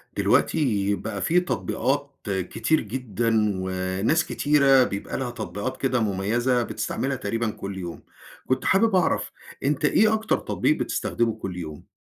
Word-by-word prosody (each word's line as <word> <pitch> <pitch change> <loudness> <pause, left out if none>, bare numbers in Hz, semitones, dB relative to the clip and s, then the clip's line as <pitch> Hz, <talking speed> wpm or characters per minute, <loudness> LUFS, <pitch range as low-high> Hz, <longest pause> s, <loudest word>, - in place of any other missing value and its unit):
دلوقتي 105 -9 +2
بقى 105 -1 -5
في 175 +2 +3
تطبيقات 145 -5 -1
كتير 105 - 0
جدًا، 115 -2 0
وناس 95 - 0
كتيرة 140 -3 +4
بيبقى 100 -4 -4
لها 130 -2 -3
تطبيقات 110 +3 -4
كده 130 -2 +1
مميزة، 115 +5 +1
بتستعملها 135 +3 -2
تقريبًا 115 -1 -2
كل 100 -2 -6
يوم. 85 -3 -7 0.4
كنت 130 0 0
حابب 210 +2 +3
أعرف، 180 -2 +1 0.3
أنت 150 +2 +1
إيه 215 +8 +4
أكتر 220 0 +1
تطبيق - - 0
بتستخدمه 115 -1 -1
كل 95 -4 -6
يوم؟ 75 -4 -8
120 Hz, 135 wpm, -25 LUFS, 100-140 Hz, 0.4 s, كتيرة